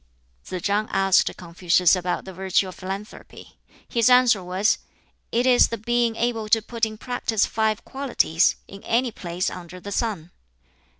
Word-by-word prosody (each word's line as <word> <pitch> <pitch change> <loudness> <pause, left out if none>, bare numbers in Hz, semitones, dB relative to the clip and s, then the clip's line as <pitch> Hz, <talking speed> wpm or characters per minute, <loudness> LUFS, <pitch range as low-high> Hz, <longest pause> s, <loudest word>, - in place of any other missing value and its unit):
Tsz 185 -2 -6
chang 205 +2 0
asked 195 -1 +3
Confucius 175 +1 +2
about 180 -1 -3
the 190 - -9
virtue 190 +1 0
of 185 - -8
philanthropy. 195 +4 -9 0.3
His 235 -1 +2
answer 250 -6 +5
was, 185 +4 +1 0.5
"It 240 +2 +1
is 250 -1 +5
the 230 - -4
being 235 +1 0
able 225 -2 -2
to 225 +1 +4
put 230 0 -1
in 215 0 -9
practice 230 -3 -1
five 220 -1 -1
qualities, 245 - +1
in 195 0 -11
any 240 +1 +1
place 180 -3 -3
under 180 0 -9
the 200 +3 -8
sun." 195 -7 -3
210 Hz, 160 wpm, -23 LUFS, 185-230 Hz, 0.5 s, answer